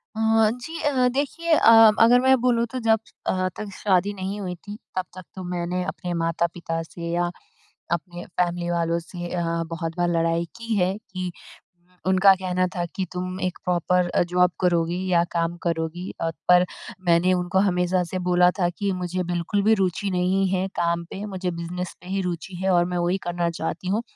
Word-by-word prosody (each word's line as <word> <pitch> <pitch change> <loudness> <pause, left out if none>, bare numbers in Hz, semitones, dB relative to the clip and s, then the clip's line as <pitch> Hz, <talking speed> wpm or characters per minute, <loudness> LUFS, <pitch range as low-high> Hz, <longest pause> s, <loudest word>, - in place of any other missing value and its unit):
अ, 220 - -2 0.3
जी, 285 +7 -7
अ, 270 -4 +2
देखिए 320 +5 0
अ, 265 - +6 0.3
अगर 245 +2 +6
मैं 265 0 +5
बोलूँ 240 -2 +2
तो 260 - -3
जब 225 -2 +3 0.3
अ, 185 0 +1
तक 215 - -5
शादी 200 0 +1
नहीं 195 +1 -4
हुई 180 -2 -4
थी, 205 +4 -10 0.2
तब 185 -1 -1
तक 185 - -8
तो 185 - -6
मैंने 180 0 -2
अपने 180 -1 -4
माता-पिता 165 0 -1
से 170 +1 -7
या 175 0 +1 0.6
अपने 175 +1 -3
फैमिली 175 -1 -1
वालों 170 -1 0
से 175 +1 -7
अ, 175 - -1 0.3
बहुत 165 0 -4
बार 175 0 +1
लड़ाई 165 0 +1
की 230 -1 -2
है, 185 -1 +2
कि 185 -4 -6 0.8
उनका 190 +1 +6
कहना 185 -1 0
था 175 -1 -1
कि 190 - -1
तुम 185 +1 -4
एक 185 0 -2
प्रॉपर 180 0 +2
अ, - - +2
जॉब 180 0 +3
करोगी 175 0 +1
या 170 -1 +4
काम 170 0 0
करोगी 170 +2 -2
अ, 165 - +1 0.2
पर 180 0 +7 0.4
मैंने 170 +2 +4
उनको 180 +1 +1
हमेशा 180 -1 +2
से 180 +2 -4
बोला 180 0 +5
था 175 -2 +3
कि 200 +3 -2
मुझे 180 0 -2
बिल्कुल 175 +3 -1
भी 220 +2 +5
रुचि 190 +2 0
नहीं 185 +2 +1
है 190 0 0
काम 170 0 0
पे, 195 +4 -7
मुझे 190 -3 -3
बिज़नेस 170 +1 -5
पे - - -13
ही 195 +1 -1
रुचि 180 0 -4
है 190 - +2
और 175 -1 +4
मैं 180 0 -3
वही 175 +2 +1
करना 175 -1 0
चाहती 165 +2 -4
हूँ। 210 +4 +1
180 Hz, 190 wpm, -24 LUFS, 175-190 Hz, 0.8 s, पर